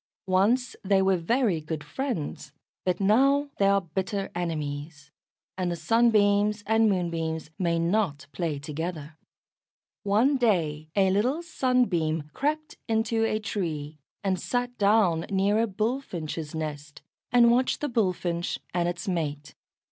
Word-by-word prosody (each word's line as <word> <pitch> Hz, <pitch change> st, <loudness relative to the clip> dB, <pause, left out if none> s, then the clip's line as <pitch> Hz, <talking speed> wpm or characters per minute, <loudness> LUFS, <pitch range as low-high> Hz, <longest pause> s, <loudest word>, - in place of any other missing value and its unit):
Once 215 Hz, +7 st, +2 dB
they 195 Hz, 0 st, +3 dB
were 190 Hz, 0 st, +3 dB
very 190 Hz, 0 st, +1 dB
good 155 Hz, 0 st, -5 dB
friends. 170 Hz, -, -4 dB, 0.3 s
But 180 Hz, -1 st, 0 dB
now 275 Hz, +8 st, +3 dB
they 195 Hz, -, +4 dB
are 200 Hz, 0 st, +4 dB
bitter 190 Hz, +3 st, -3 dB
enemies, 150 Hz, -3 st, -4 dB, 0.5 s
and 180 Hz, -1 st, 0 dB
the -, -, -1 dB
Sunbeams 210 Hz, +2 st, +3 dB
and 220 Hz, 0 st, +3 dB
Moonbeams 165 Hz, -4 st, -2 dB
may 170 Hz, -2 st, +1 dB
not 170 Hz, -4 st, 0 dB
play 165 Hz, -5 st, -2 dB
together. 155 Hz, +1 st, -5 dB, 0.9 s
One 225 Hz, +8 st, +3 dB
day 160 Hz, -, 0 dB
a 190 Hz, -2 st, +4 dB
little 250 Hz, -, +1 dB
Sunbeam 180 Hz, -, 0 dB
crept 305 Hz, +2 st, -2 dB
into 225 Hz, 0 st, +1 dB
a 215 Hz, -, 0 dB
tree, 155 Hz, -8 st, -4 dB, 0.2 s
and 190 Hz, -2 st, 0 dB
sat 245 Hz, 0 st, -2 dB
down 200 Hz, -5 st, +3 dB
near 200 Hz, +2 st, +2 dB
a 230 Hz, -, +2 dB
Bullfinch's 190 Hz, -, -3 dB
nest, 150 Hz, -2 st, -6 dB, 0.3 s
and 235 Hz, -1 st, +6 dB
watched 255 Hz, +2 st, +2 dB
the 295 Hz, -, -1 dB
Bullfinch 180 Hz, -7 st, -1 dB, 0.2 s
and 175 Hz, -1 st, +1 dB
its 175 Hz, +1 st, -5 dB
mate. 150 Hz, -5 st, -3 dB
190 Hz, 135 wpm, -27 LUFS, 160-225 Hz, 0.9 s, and